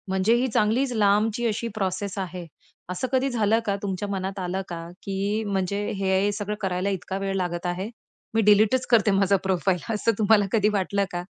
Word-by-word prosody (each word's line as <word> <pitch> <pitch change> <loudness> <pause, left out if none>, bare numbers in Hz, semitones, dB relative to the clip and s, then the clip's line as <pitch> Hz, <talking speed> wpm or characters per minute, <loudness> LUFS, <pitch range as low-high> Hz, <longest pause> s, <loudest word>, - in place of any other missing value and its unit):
म्हणजे 190 +4 +2
ही 250 +2 +1
चांगलीच 240 +4 +1
लांबची 215 +2 +2
अशी 225 +1 -2
प्रोसेस 200 0 -2
आहे. 180 -2 -4 0.4
असं 180 +8 -2
कधी 265 +1 +2
झालं 225 -2 +2
का, 200 - 0
तुमच्या 200 0 -3
मनात 195 0 -3
आलं 185 +1 -2
का, 165 -1 -6 0.2
की 200 +2 -1
म्हणजे 200 +1 -1
हे 190 +1 +2
सगळं 210 0 -3
करायला 185 0 -1
इतका 190 0 -3
वेळ 195 0 -2
लागत 175 -2 -2
आहे? 180 +4 -2 0.4
मी 225 - +3
डिलीटच 210 +4 +4
करते 220 -3 +4
माझा 195 0 +3
प्रोफाइल 190 -1 +1
असं 220 +2 +1
तुम्हाला 210 -1 +4
कधी 210 -2 +3
वाटलं 200 0 0
का? 175 0 -3
200 Hz, 180 wpm, -25 LUFS, 190-215 Hz, 0.4 s, डिलीटच